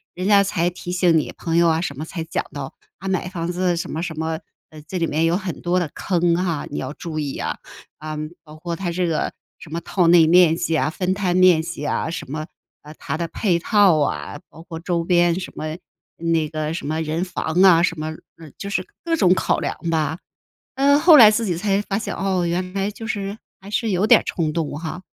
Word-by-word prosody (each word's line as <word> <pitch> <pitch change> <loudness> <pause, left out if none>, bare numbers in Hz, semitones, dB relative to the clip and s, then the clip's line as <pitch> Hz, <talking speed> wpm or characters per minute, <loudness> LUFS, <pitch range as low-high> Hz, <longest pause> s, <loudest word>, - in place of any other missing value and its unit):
人 185 +2 -3
家 200 -1 +6
才 180 -3 0
提 175 0 -7
醒 180 -2 +3
你， - - -4
朋 165 0 -1
友 170 0 +5
啊 160 0 +1
什 145 -5 -4
么 145 - -5
才 165 +1 -5
讲 165 - -2
到， 140 -2 -6 0.2
啊 190 - -8
买 185 -1 -1
房 175 -2 -3
子 180 0 0
什 170 - -4
么 160 - -3
什 170 -3 -5
么， 160 0 -2 0.3
呃 155 -1 -11
这 185 - -4
里 170 - +1
面 160 +1 0
有 170 +2 +2
很 190 -4 -6
多 180 +1 +1
的 175 -4 -2
坑 175 -2 +1
哈， 170 -4 -1
你 145 - -3
要 130 +2 -5
注 160 -1 -5
意 145 -2 -3
啊， - - -3 0.4
啊 155 0 -6 0.3
包 155 -1 -13
括 170 +2 -5
它 175 0 -3
这 180 +1 0
个 165 -2 -1 0.3
什 155 - -12
么 165 - -2
套 180 -1 +1
内 170 -1 +7
面 170 0 +5
积 165 -1 -1
啊、 155 - +1
分 180 +3 -1
摊 190 -3 -1
面 185 -3 +6
积 160 -2 -6
啊， - - -1
什 160 -5 -6
么 155 +1 -4 0.3
啊 150 +1 -12
它 - - -4
的 170 +1 -2
配 175 -1 0
套 190 -3 +4
啊， 145 0 -2
包 165 - -14
括 165 -2 -8
周 170 0 -1
边 175 0 +3
什 185 - -7
么 155 +1 -5 0.4
那 165 -2 0
个 155 0 -3
什 165 - -5
么 155 +1 -1
人 160 +2 -2
防 180 -2 -1
啊， 175 -3 +7
什 170 -3 0
么 155 - -3 0.3
呃 160 -2 -12
就 200 - -6
是 - - 0 0.2
各 335 -1 +1
种 185 - +4
考 - - 0
量 - - -3
吧。 160 0 0 0.6
呃 280 +2 +4
后 320 +1 +7
来 225 -6 +10
自 220 +1 0
己 175 -4 -1
才 195 +2 +1
发 200 -1 -2
现 220 - -4
哦， 190 -2 0
原 180 +2 -2
来 195 +1 -1
就 225 +2 -9
是 200 -1 -3 0.2
还 195 - -11
是 225 +2 -1
有 190 +2 +1
点 - - +7
儿 - - -9
冲 160 -3 -1
动 160 -2 -2
哈， 170 +3 -6
170 Hz, 255 characters per minute, -21 LUFS, 160-185 Hz, 0.6 s, 来